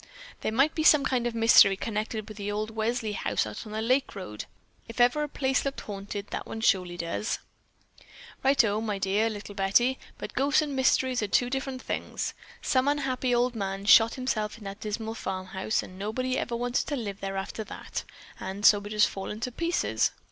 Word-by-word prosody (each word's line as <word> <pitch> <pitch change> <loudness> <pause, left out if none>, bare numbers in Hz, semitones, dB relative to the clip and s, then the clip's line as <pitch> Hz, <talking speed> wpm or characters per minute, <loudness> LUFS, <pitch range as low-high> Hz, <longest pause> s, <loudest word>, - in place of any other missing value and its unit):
"There - - -2
might 275 +7 +3
be 320 - -1
some 300 -2 +6
kind 245 -2 +1
of 235 - -4
a - - -3
mystery 225 -4 +7
connected 215 0 -3
with 215 -2 -10
that 205 0 -3
old 215 +1 -2
Welsley 225 0 -1
house 100 - 0
out 105 - -7
on - - -9
the 220 +1 -2
lake 255 +2 +1
road. 105 - -6 0.4
If 230 - -9
ever 245 +5 +4
a 300 - -2
place 265 -2 0
looked 275 0 -3
haunted, 200 0 -6
that - - -4
one 225 - -6
surely 180 -5 +2
does." 170 +6 -2 1.1
"Righto, 225 -6 +3
my 215 -3 -2
dear 200 +3 +1
little 205 -1 -7
Betty, 210 +7 +2 0.2
but - - -7
ghosts 285 +3 +3
and 290 -2 -4
mysteries 260 -1 +2
are 210 - -1
two 245 +5 +2
different 265 -1 -3
things. - - -3 0.3
Some 260 -1 +2
unhappy 265 -3 +1
old 245 +1 +2
man 195 -1 -3
shot 225 +2 +7
himself 220 -5 -2
in 225 - -13
that 195 +1 -7
dismal 220 +1 -4
farmhouse 190 0 -2
and 185 +1 -11
nobody 255 +6 -1
ever 240 - -2
wanted 245 +1 -1
to 290 - -1
live 205 -6 -5
there 195 0 -4
after 195 +3 -4
that; - - -6 0.4
and 195 +2 -4
so 205 - +8
it 200 - -11
has 210 -1 +3
just - - +7
fallen 200 +2 -6
to 250 - -2
pieces. 335 +7 +1
220 Hz, 205 wpm, -28 LUFS, 200-255 Hz, 1.1 s, so